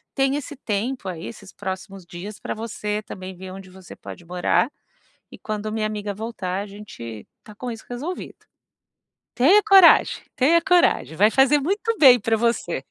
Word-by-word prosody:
tenha 270 0 +1
esse 290 +1 -9
tempo 235 -1 -3
aí, 170 -2 -7
esses 200 -4 -11
próximos 190 0 -7
dias, 185 +5 -9
pra - - -4
você 210 -2 -4
também 185 -2 -9
ver 185 +1 -9
onde 190 0 -10
você 185 0 -13
pode 175 - -11
morar, 180 - +1 0.6
e - - -11
quando 215 0 -4
minha 215 0 -1
amiga 210 -1 -4
voltar 200 -3 -4
a - - -9
gente 120 - -10 0.2
tá 210 - -14
com 245 +3 -5
isso 225 - -9
resolvido." 290 +10 -7 0.9
Tenha 345 +12 +5
coragem! 390 -5 +6
Tenha 315 +6 +4
coragem! 355 - +2
Vai 210 +3 +5
fazer 270 +4 +4
muito 410 +10 -1
bem 255 -4 +8
pra 225 +2 +1
você. 215 - -1
215 Hz, 165 wpm, -23 LUFS, 190-270 Hz, 0.9 s, bem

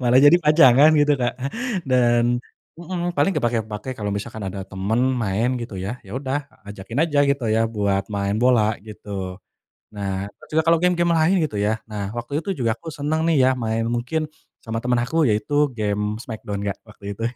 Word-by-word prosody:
malah 125 0 +4
jadi 145 +4 +8
pajangan 150 -1 +7
gitu, 145 0 +4
Kak. 120 - +1 0.6
Dan 120 -1 +3 0.4
mhm, 175 0 -3
paling 195 - +3
kepakai-kepakai 115 0 -2
kalau 105 -1 -2
misalkan 110 +1 -5
ada 95 +1 -6
temen 95 +5 -1 0.2
main 110 +4 0
gitu 115 -4 -6
ya. 100 +7 -5
Ya 100 - -6
udah 135 +1 -3 0.2
ajakin 105 +5 -6
aja 145 -3 -1
gitu 140 -3 0
ya, 110 - +2
buat 100 -3 0
main 100 -1 -1
bola 110 -4 +3
gitu. 100 -3 -7 0.6
Nah, 100 -1 -3
terus - - -17
juga - - +2
kalo 165 - +6
game-game 175 -1 +2
lain 165 +4 +3
gitu 110 - -10
ya, 105 +2 0
nah 105 -2 -4
waktu 125 +7 -4
itu 195 - -2
juga 115 -2 +1
aku 160 +6 -9
seneng 155 +2 -1
nih 135 -4 +4
ya, - - +5
main, 115 -2 -1
mungkin 125 +7 -1 0.3
sama 115 0 -5
temen 125 -1 +2
aku 160 +7 +1
yaitu 145 +5 +1
game 105 0 -1
Smackdown, 110 -4 -6
Kak, 100 - -2
waktu 100 -2 -9
itu. 115 - -6
120 Hz, 185 wpm, -22 LUFS, 105-140 Hz, 0.6 s, jadi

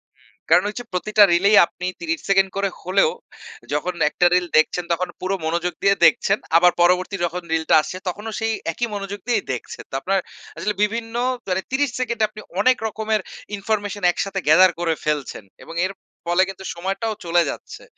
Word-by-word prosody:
হুম। - - -29 0.3
কারণ 175 +3 +6
ওই 210 - -8
যে - - -6
প্রতিটা 210 +3 +4
রিলেই 200 +5 +4
আপনি 180 - -9 0.2
৩০ 330 -1 -2
সেকেন্ড 195 0 +4
করে 200 0 +1
হলেও, 185 -1 +2 0.6
যখন 160 +5 -1 0.2
একটা 175 - +1
রিল 180 -1 +2
দেখছেন 160 +3 +2
তখন 175 +2 0
পুরো 190 +1 -1
মনোযোগ 170 +2 -1
দিয়ে 195 0 +4
দেখছেন। 200 -4 +4 0.2
আবার 175 +1 +6
পরবর্তী 180 +3 +3
যখন 175 +1 -4
রিলটা 160 0 +2
আসছে, 180 - -6
তখনও 210 +5 -4
সেই 225 0 0 0.2
একই 240 +8 -2
মনোযোগ 200 0 -5
দিয়েই 230 -5 +1
দেখছে। 125 - -7
তো - - -23
আপনার 195 +4 +1 0.4
আসলে 210 +1 -1
বিভিন্ন 225 +2 -2 0.3
তারে 185 0 0
৩০ 280 +1 +1
সেকেন্ড 235 -2 -2
এ - - +6
আপনি 215 0 -11 0.2
অনেক 255 +5 +4
রকমের 220 0 -1 0.4
ইনফরমেশন 205 -1 -3
একসাথে 195 +2 -3
gather 180 +4 +7
করে 170 -2 +1
ফেলছেন 150 -7 -2 0.2
এবং 165 - -10
এর 190 - -3 0.4
ফলে 175 +2 +4
কিন্তু 190 0 -9
সময়টাও 195 +6 -2
চলে 170 +1 +3
যাচ্ছে। - - -8
195 Hz, 180 wpm, -21 LUFS, 175-215 Hz, 0.6 s, gather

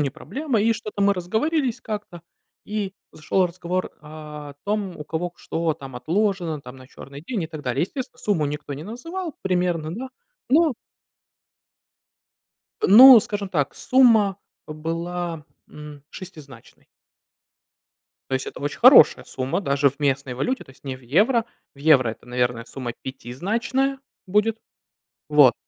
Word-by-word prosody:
не 140 -2 0
проблема. 220 - -3
И 225 +2 +3
что-то 215 -2 -6
мы 200 0 +4
разговорились 245 - -1
как-то, 205 -7 -6 0.4
и 205 -2 -3 0.2
зашел 180 +4 +1
разговор 180 +1 -3
о 150 -1 -10
том, 205 -3 -2
у 150 - -8
кого 165 +3 -3
к 175 - -37
что 165 -1 -1
там 135 -5 -10
отложено 170 +2 -1
там 125 -1 -11
на 130 -1 -14
черный 140 +2 -12
день 225 -9 -2
и - - -3
так 155 -2 -9
далее. 130 +2 -1
Естественно, 250 - -5
сумму 190 -11 0
никто 145 0 -5
не 140 - -8
называл 330 - -6
примерно 175 -4 -1
да, 260 +6 -6 0.4
но 315 +2 +4 2.1
ну 250 +5 +10
скажем 205 -1 -4
так, 145 -7 -1
сумма, 230 -7 +4 0.3
э, - - -5
была, 165 +1 -4 0.2
м, 150 -1 -11
шестизначной. 155 - -13 1.4
То 130 - 0
есть 130 - -2
это - - -8
очень 145 0 -4
хорошая 245 - +7
сумма 130 +7 -3
даже 140 -5 +2
в 140 +2 -11
местной 135 -2 0
валюте, 250 - -2
то - - -17
есть 130 - -21
не 130 -1 -4
в - - -18
евро. 210 - +2 0.3
В - - -20
евро 140 -4 +4
это, 110 - -12
наверное, 125 -1 -1
сумма 125 -1 -6
пятизначная 220 - -2 0.3
будет. 210 +4 +1 0.7
Вот. 145 -5 +6
170 Hz, 150 wpm, -23 LUFS, 145-215 Hz, 2.1 s, ну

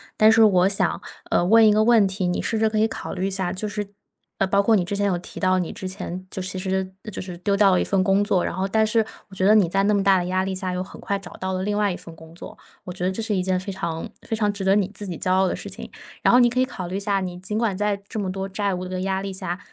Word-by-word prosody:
但 215 +1 +6
是 225 - +5
我 190 -3 +5
想 200 - 0 0.3
呃， - - +2
问 220 +4 +6
一 210 - +5
个 215 +1 +3
问 225 -3 +5
题， 190 -1 -2
你 180 0 0
试 225 - -1
着 220 0 +2
可 215 - -2
以 220 - +4
考 - - -6
虑 190 0 -2
一 - - -1
下， 190 -2 -1
就 205 +3 -4
是， 210 0 -3 0.5
呃， - - +1
包 200 +1 +2
括 220 +1 +4
你 180 - 0
之 200 - -3
前 205 0 0
有 185 -3 +1
提 175 - -10
到， 185 -1 +3
你 175 - -3
之 185 - -6
前 185 -1 -6
就 190 - -5
其 185 +1 -4
实 190 0 -2 0.2
就 - - -5
是 180 -2 -7
丢 200 +2 0
掉 200 -1 +5
了 180 - +3
一 - - +1
份 195 -2 +1
工 195 +1 +3
作， 200 -4 +1
然 - - -3
后 190 +1 -1
但 220 +2 +2
是 220 0 +2 0.2
我 195 - -13
觉 185 - +1
得 210 - +6
你 210 -5 +5
在 195 +3 +1
那 210 +1 +3
么 200 - +2
大 195 -1 +4
的 175 - -1
压 185 +1 0
力 190 -1 -3
下 185 0 -3
又 180 0 -2
很 185 - -9
快 200 0 -2
找 190 -2 -11
到 190 0 -4
了 185 0 -2
另 205 +1 -1
外 205 -1 +2
一 180 - -4
份 165 - -12
工 160 0 -14
作， - - -10 0.3
我 180 - -6
觉 180 - -6
得 185 - +1
这 190 - -3
是 215 -2 -1
一 185 - 0
件 185 0 0
非 190 +1 -6
常 170 -4 -4
非 - - -6
常 210 -2 +1
值 200 -1 -5
得 190 +1 +4
你 195 -3 +1
自 205 - -4
己 175 -4 -5
骄 185 - +1
傲 190 +1 +3
的 - - -1
事 - - -7
情。 - - -8 0.3
然 - - +4
后 245 - +7
你 240 -1 +5
可 250 +2 -1
以 - - +3
考 185 -8 -6
虑 185 - -5
一 - - -1
下， 200 -1 +1
你 180 -2 -5
尽 210 +3 -4
管 220 -4 0
在 205 0 -1
这 - - -7
么 190 -2 -2
多 195 0 -4
债 200 0 -1
务 180 0 -4
的 185 0 -4
压 190 0 -1
力 195 0 -4
下， 180 -1 -4
195 Hz, 355 characters per minute, -23 LUFS, 185-205 Hz, 0.5 s, 后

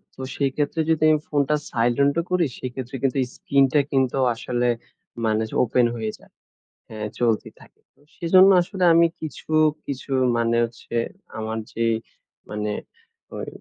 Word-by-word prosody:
তো - - -9
সেইক্ষেত্রে 145 +3 0
যদি 155 -1 +2
আমি 155 - +3
ফোনটা 145 0 +2 0.2
silent 120 +4 +2
ও - - +3
করি 180 -2 +2
সেক্ষেত্রে 130 +1 -6
কিন্তু 135 0 +1
এই - - -4
স্কিনটা 140 +1 +3
কিন্তু 135 -1 +1 0.2
আসলে 120 +1 -1 0.6
মানে 110 0 +1
যে - - -8
ওপেন 120 +1 +2
হয়ে 110 -1 -3
যায়। - - -22 0.6
হ্যাঁ, 105 -1 -5
চলতে 115 -3 +1
থাকে। - - -19 0.2
ও - - -26
সেজন্য 185 +3 +6
আসলে 185 +1 -3
আমি 170 0 +6 0.2
কিছু, 155 0 -8 0.4
কিছু 140 0 -6 0.3
মানে 115 0 +1
হচ্ছে 115 0 -7 0.4
আমার 110 0 -3
যে 115 - -2 0.7
মানে 105 0 -3 0.7
ওই - - -5
130 Hz, 150 wpm, -23 LUFS, 115-150 Hz, 0.7 s, সেজন্য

